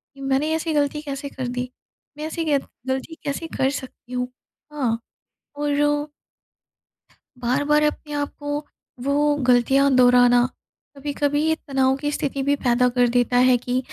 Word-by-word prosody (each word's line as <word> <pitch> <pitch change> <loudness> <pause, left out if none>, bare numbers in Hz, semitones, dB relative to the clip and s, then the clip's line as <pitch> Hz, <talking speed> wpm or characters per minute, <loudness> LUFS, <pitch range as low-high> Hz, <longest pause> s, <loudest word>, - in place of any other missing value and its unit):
कि 275 - -12
मैंने 270 +3 +1
ऐसी 320 0 -2
गलती 295 0 +1
कैसे 280 -1 -5
कर 260 -2 -5
दी? 250 0 -3 0.5
मैं 305 - -4
ऐसी 330 +1 -3
गे 290 -2 +3 0.3
गलती 265 +5 -3
कैसे 295 +3 -3
कर 265 - +3
सकती 255 -2 -8
हूँ? 250 0 -1 0.5
हाँ 245 -6 0 0.6
और 290 0 -1 1.7
बार-बार 290 +5 +2
अपने 300 0 -2
आप 290 -1 -2
को, 290 0 -3 0.4
वो 290 +1 +2
गलतियाँ 265 +3 +4
दोहराना, 245 -1 +6 0.5
कभी-कभी 290 +1 0
ये 320 - +3
तनाव 265 -3 +1
की 290 +1 -2
स्थिति 280 -1 -2
भी 285 +1 +2
पैदा 245 +1 +4
कर 245 0 +3
देता 245 0 +3
है 250 -1 +5
कि 250 +1 -1
275 Hz, 150 wpm, -23 LUFS, 250-290 Hz, 1.7 s, दोहराना